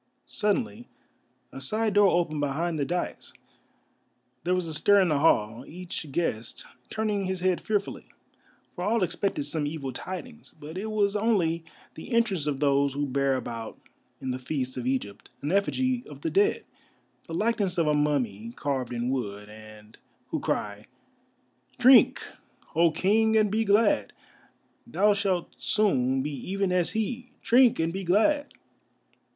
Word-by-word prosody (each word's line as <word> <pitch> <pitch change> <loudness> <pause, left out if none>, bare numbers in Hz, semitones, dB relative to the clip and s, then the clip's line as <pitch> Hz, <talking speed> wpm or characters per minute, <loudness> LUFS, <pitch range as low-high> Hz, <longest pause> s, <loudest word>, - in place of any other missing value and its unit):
Suddenly 225 +3 -1 0.6
a 135 - -9
side 215 - 0
door 205 0 +6
opened 170 -4 0
behind 155 +3 -1
the 140 - +1
daïs, 175 0 -4 1.1
there 180 +2 +1
was 180 -1 -1
a 160 - -5
stir 205 +6 +4
in 185 -3 +3
the 150 -2 +2
hall, 115 -6 +2
each 170 -3 -7
guest 120 -8 -2 0.2
turning 210 -3 -1
his 185 -1 -3
head 185 -1 +1
fearfully, 205 -2 -2 0.7
for 180 - -5
all 215 +1 +2
expected 190 -3 -1
some 145 +1 -2
evil 145 -4 -5
tidings. 225 - -8
But 150 +3 -9
it 200 +4 -4
was 210 -2 +1
only 190 -7 +1 0.3
the 160 - -10
entrance 200 -10 +1
of 140 -2 -1
those 140 -1 +2
who 145 0 0
bear 135 0 +1
about 115 -3 -5 0.4
in 130 - -3
the 125 - -4
feasts 130 -1 -3
of 125 -1 -4
Egypt 105 -6 -3
an 145 - -1
effigy 245 +6 +1
of - - -11
the 325 - -2
Dead, 410 +2 +2 0.6
the 165 - -5
likeness 210 -3 0
of 165 - +3
a 150 - +2
mummy 125 -7 -1
carved 130 -4 -2
in 120 +1 -1
wood, 105 -5 -4
and 110 0 -14 0.3
who - - -2
cry: 105 +1 -3 0.9
"Drink, 255 +1 +6 0.5
O 170 +1 +4
King, 220 +6 +2
and 210 -2 +3
be 220 +1 +1
glad, 210 +2 +2 0.7
thou 210 -2 +3
shalt 195 -4 -1
soon 135 - +1
be 150 - -3
even 190 +7 -2
as 180 -2 +1
he! 240 +3 -3
Drink, 245 0 +5
and 165 +1 0
be 195 +1 -4
glad." 255 - +2
175 Hz, 155 wpm, -27 LUFS, 135-210 Hz, 1.1 s, door